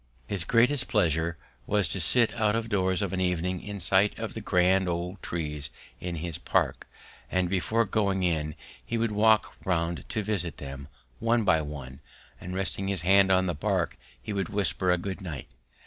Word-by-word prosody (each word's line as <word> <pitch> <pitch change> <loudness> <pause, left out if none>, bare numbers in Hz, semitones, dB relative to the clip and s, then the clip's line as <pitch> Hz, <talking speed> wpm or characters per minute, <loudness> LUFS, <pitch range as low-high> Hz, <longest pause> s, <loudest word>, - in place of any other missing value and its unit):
His 90 +5 -3
greatest 125 +3 +3
pleasure 85 -4 +1 0.3
was 105 -1 +2
to 95 - -2
sit 115 +7 +3
out 110 -3 +1
of 115 0 -2
doors 95 -2 +1
of 95 -2 -2
an 95 - -1
evening 90 0 0
in 105 -1 -6
sight 95 +3 +3
of 115 -1 -4
the 110 - -5
grand 95 -1 +3
old 90 +2 -3
trees 75 -3 -4 0.3
in 90 +3 -4
his 85 0 -4
park, - - 0 0.4
and 95 -1 0
before 110 +5 +1
going 100 -2 0
in 75 -4 0 0.3
he 115 - -2
would 115 -1 0
walk 110 +1 +3
round 85 -2 -1
to 110 -3 -1
visit 95 -5 -2
them, 70 -1 -8 0.3
one 115 0 +2
by 80 -6 +3
one, 70 -3 -7 0.4
and 90 +1 -6
resting 95 0 -2
his 95 -4 -1
hand 95 +1 +5
on 95 0 +4
the 90 - 0
bark 75 - -1 0.2
he 105 - -5
would 95 -3 -1
whisper 100 -2 0
a 90 - +4
goodnight. 90 -5 -6
95 Hz, 180 wpm, -28 LUFS, 85-105 Hz, 0.4 s, hand